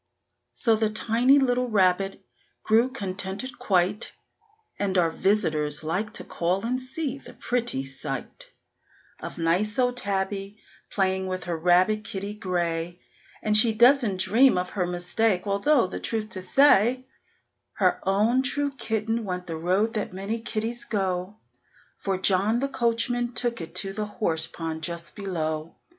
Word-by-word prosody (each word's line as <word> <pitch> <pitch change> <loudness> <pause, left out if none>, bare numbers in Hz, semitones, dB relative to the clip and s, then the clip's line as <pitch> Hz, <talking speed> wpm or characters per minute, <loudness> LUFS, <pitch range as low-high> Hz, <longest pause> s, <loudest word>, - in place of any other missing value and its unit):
So 230 -2 +3
the 220 0 +1
tiny 235 +5 +3
little 250 -2 +1
rabbit 195 -2 +1 0.4
grew 230 +4 +3
contented 200 +2 -4
quite, 200 -2 +1 0.7
And 195 -2 0
our 170 -2 +3
visitors 155 -7 0
like 180 +7 -2
to - - -5
call 180 +5 -1
and 255 +2 -1
see 270 +1 -4
the - - -14
pretty 235 - -1
sight 135 -1 -6 0.7
Of - - -7
nice 180 +6 0
old 250 -1 +1
Tabby 195 -1 -2 0.3
playing 190 -1 0
with 185 -1 -3
her 175 -1 -3
rabbit 180 +6 +3
kitty 200 0 -4
gray; 175 -3 -2 0.4
And 210 0 +2
she 220 +1 +6
doesn't 235 -3 +4
dream 245 +4 +4
of 180 0 -2
her 180 -3 -1
mistake, 180 +3 0
although, 215 +6 +3
the 185 - -5
truth 220 -2 -3
to 185 - -5
say, 255 +3 +4 0.7
Her - - +2
own 210 +7 +2
true 285 +2 -1
kitten 225 -1 -2
went 180 -2 -4
the 165 -3 -5
road 185 +7 +1
that 210 -4 -3
many 200 +5 -4
kittys 230 +1 -3
go; 190 -1 -2 0.6
For 195 -1 -1
John 195 +4 +2
the 275 +2 -1
coachman 240 -1 0
took 235 -5 -1
it 165 +1 -8
to 195 +1 -1
the 210 +1 -3
horse 165 -7 +1
pond 160 -1 -5
just 170 +1 -4
below. 160 -5 -3
200 Hz, 150 wpm, -26 LUFS, 180-230 Hz, 0.7 s, she